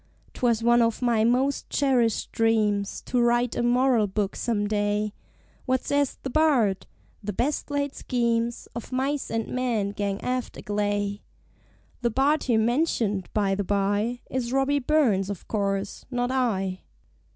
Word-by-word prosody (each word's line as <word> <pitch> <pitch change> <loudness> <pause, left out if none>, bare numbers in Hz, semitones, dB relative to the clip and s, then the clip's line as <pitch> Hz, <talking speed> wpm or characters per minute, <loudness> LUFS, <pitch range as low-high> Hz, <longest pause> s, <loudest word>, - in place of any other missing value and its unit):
'Twas 235 -2 +1
one 240 0 +5
of 230 +2 +1
my 235 -3 +3
most 255 +4 +1
cherished 250 -6 +1
dreams 210 -3 +1
To 250 - +1
write 240 0 +2
a - - 0
Moral 240 -2 +3
Book 200 0 -2
some 220 -4 -1
day; 205 0 0 0.5
What 260 0 +1
says 285 -1 0
the 265 - -3
Bard? 250 -11 +2 0.4
"The 205 +1 -3
best 275 +11 -1
laid 285 -1 -1
schemes 235 -1 -1
Of 235 +2 -7
Mice 270 +2 -1
and 225 0 -2
Men 235 -6 -1
gang 200 -1 -2
aft 250 -1 -3
agley!" 205 0 -2 0.8
(The 240 - +2
Bard 280 +6 +2
here 235 -3 +2
mentioned, 225 - +1
by 200 -2 +2
the 200 +1 -1
bye, 205 +5 0
Is 250 -2 -3
Robbie 270 +2 +2
Burns, 245 -9 +2
of 200 -3 -6
course 200 -1 -2
not 245 -1 -1
I.) 195 -8 0
235 Hz, 150 wpm, -26 LUFS, 205-255 Hz, 0.8 s, one